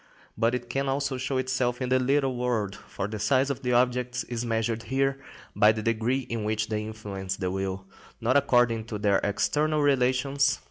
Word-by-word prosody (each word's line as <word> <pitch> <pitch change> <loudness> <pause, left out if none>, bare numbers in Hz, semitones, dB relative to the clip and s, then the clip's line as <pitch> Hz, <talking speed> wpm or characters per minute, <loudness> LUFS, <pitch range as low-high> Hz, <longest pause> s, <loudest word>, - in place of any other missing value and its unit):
But 115 +2 +2
it 120 -1 -5
can 135 +3 -1
also 135 -1 -1
show 130 +1 -1
itself 125 -1 0
in 130 -1 -2
the 130 0 +3
little 135 0 +1
world, 115 -5 -1
for 95 - -6
the 105 0 -5
size 135 +4 +2
of 135 -1 -5
the 125 -2 0
objects 125 0 +1
is 120 -1 -4
measured 115 -1 -1
here 135 +1 +1 0.4
by 105 -1 +6
the 110 0 -4
degree 115 +4 +1
in 115 -3 -4
which 110 +1 -1
they 105 -1 -1
influence 100 -3 -5
the 90 -2 -2
will, 95 0 -3 0.3
not 120 +3 +1
according 120 -5 +3
to 110 -2 -5
their 100 -1 +2
external 150 +8 +1
relations. 135 0 +2
120 Hz, 190 wpm, -27 LUFS, 110-130 Hz, 0.4 s, by